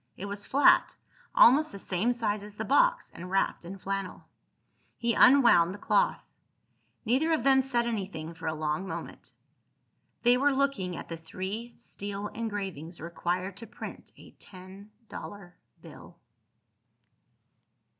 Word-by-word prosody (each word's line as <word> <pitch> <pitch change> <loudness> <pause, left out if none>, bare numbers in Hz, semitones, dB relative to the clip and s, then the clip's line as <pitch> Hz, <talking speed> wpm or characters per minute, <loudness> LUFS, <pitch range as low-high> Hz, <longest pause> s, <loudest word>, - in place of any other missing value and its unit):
It 200 - -6
was 200 0 -6
flat, 280 +2 +4 0.4
almost 290 +6 +6
the 200 - -8
same 195 +4 0
size 220 -4 -1
as 205 0 -11
the - - -4
box, - - +2
and 180 +1 -9
wrapped 195 -1 0
in 185 +3 -8
flannel. 195 0 -4 0.7
He 235 0 0
unwound 235 -11 +6
the - - -9
cloth. - - +1 0.8
Neither 265 +8 +2
of 310 - 0
them 265 0 +5
said 245 -3 -1
anything 190 -8 -4
for 165 0 -8
a 160 - -1
long 155 +4 -2
moment. - - -8 0.9
They 245 +1 +5
were 280 +1 +2
looking 265 -11 0
at - - -8
the 165 - -6
three 190 +8 -6
steel 205 -2 -6
engravings 195 -7 -5
required 175 +3 -3
to 230 +2 -8
print - - -9
a - - -15
ten 190 +2 -12 0.2
dollar 185 -4 -9 0.3
bill. - - -13
200 Hz, 140 wpm, -28 LUFS, 180-240 Hz, 0.9 s, almost